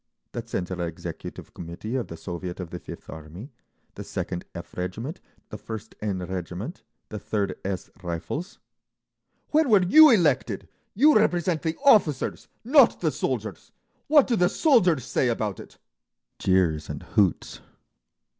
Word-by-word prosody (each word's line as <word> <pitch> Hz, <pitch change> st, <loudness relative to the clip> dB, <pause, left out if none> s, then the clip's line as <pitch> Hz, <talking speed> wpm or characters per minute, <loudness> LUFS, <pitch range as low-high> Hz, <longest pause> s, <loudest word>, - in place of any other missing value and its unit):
"The 120 Hz, -, -4 dB
Central 90 Hz, -5 st, -4 dB
Executive 85 Hz, -1 st, -7 dB
Committee 85 Hz, +7 st, -7 dB
of 130 Hz, -, -2 dB
the 85 Hz, -, -8 dB
Soviet 90 Hz, +1 st, -6 dB
of 90 Hz, -3 st, -6 dB
the 90 Hz, -, -5 dB
Fifth -, -, -10 dB
Army, 80 Hz, -, -10 dB, 0.4 s
the -, -, -8 dB
Second 90 Hz, -1 st, -4 dB
F— -, -, -9 dB
regiment, 110 Hz, -, -5 dB, 0.3 s
the 105 Hz, -, -8 dB
First 110 Hz, -1 st, -8 dB
N— 105 Hz, -3 st, -1 dB
Regiment, 95 Hz, -, -5 dB, 0.3 s
the 105 Hz, -, -6 dB
Third 100 Hz, -2 st, -2 dB
S— 95 Hz, -1 st, -4 dB
Rifles…." 90 Hz, -, -5 dB, 0.9 s
"When 310 Hz, -2 st, +3 dB
were 205 Hz, -4 st, +6 dB
you 310 Hz, -, +8 dB
elected? 170 Hz, -, +2 dB, 0.3 s
You 295 Hz, +8 st, +6 dB
represent 175 Hz, -5 st, +2 dB
the 160 Hz, -1 st, -2 dB
officers, 180 Hz, -, +3 dB, 0.2 s
not 275 Hz, +5 st, +5 dB
the -, -, +1 dB
soldiers! -, -, -4 dB, 0.4 s
What 295 Hz, -2 st, +6 dB
do 240 Hz, -, +1 dB
the 180 Hz, -4 st, +3 dB
soldiers 185 Hz, -, +3 dB
say 120 Hz, +2 st, +1 dB
about 110 Hz, -5 st, -2 dB
it?" -, -, -12 dB, 0.6 s
Jeers 85 Hz, -5 st, +1 dB
and -, -, -6 dB
hoots. 100 Hz, -5 st, 0 dB
110 Hz, 145 wpm, -25 LUFS, -, 0.9 s, you